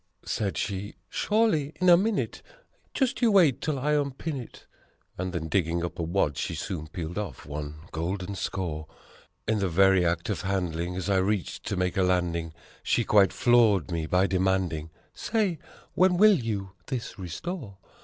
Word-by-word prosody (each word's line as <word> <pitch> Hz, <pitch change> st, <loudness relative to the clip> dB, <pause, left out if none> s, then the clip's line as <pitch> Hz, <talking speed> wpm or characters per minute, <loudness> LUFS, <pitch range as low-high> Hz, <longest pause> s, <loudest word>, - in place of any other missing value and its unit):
8 -, -, -11 dB
Said 100 Hz, -3 st, -1 dB
she, 100 Hz, 0 st, -3 dB
"Surely! 210 Hz, -10 st, +1 dB
In 185 Hz, -, +2 dB
a 175 Hz, -, +9 dB
minute 205 Hz, +4 st, 0 dB, 0.5 s
just 265 Hz, -2 st, 0 dB
you 235 Hz, -2 st, +5 dB
wait 175 Hz, -, +5 dB
till 155 Hz, -3 st, -1 dB
I 145 Hz, +3 st, 0 dB
unpin 145 Hz, +2 st, -2 dB
it." 125 Hz, -, -10 dB, 0.5 s
And 95 Hz, 0 st, -3 dB
then 85 Hz, -3 st, -3 dB
digging 85 Hz, -1 st, 0 dB
up 85 Hz, -, -7 dB
a -, -, 0 dB
wad 80 Hz, -4 st, 0 dB
she -, -, -2 dB
soon 80 Hz, -5 st, -4 dB
peeled 85 Hz, +3 st, -5 dB
off 105 Hz, -3 st, -6 dB
one 75 Hz, +1 st, -5 dB, 0.2 s
golden 90 Hz, +4 st, -3 dB
score. 85 Hz, -5 st, -3 dB, 0.6 s
In 110 Hz, -1 st, +1 dB
the 95 Hz, -2 st, 0 dB
very 95 Hz, +1 st, +5 dB
act 85 Hz, 0 st, 0 dB
of 90 Hz, -, -2 dB
handing, 90 Hz, -2 st, -2 dB
as 95 Hz, +1 st, -3 dB
I 100 Hz, -1 st, +3 dB
reached 95 Hz, 0 st, -1 dB
to 100 Hz, -, -2 dB
make 90 Hz, 0 st, 0 dB
a -, -, +4 dB
landing, 85 Hz, -3 st, 0 dB, 0.3 s
She 120 Hz, -, +1 dB
quite 100 Hz, -4 st, +5 dB
floored 110 Hz, -, +3 dB
me 80 Hz, -2 st, -2 dB
by 90 Hz, +3 st, +3 dB
demanding, 95 Hz, -4 st, 0 dB, 0.2 s
"Say, 205 Hz, -8 st, -1 dB, 0.3 s
when 180 Hz, -1 st, +4 dB
will 215 Hz, +2 st, +7 dB
you 100 Hz, -5 st, -3 dB, 0.2 s
this 125 Hz, -5 st, -5 dB
restore? 100 Hz, -, -6 dB
95 Hz, 175 wpm, -27 LUFS, 85-130 Hz, 0.6 s, a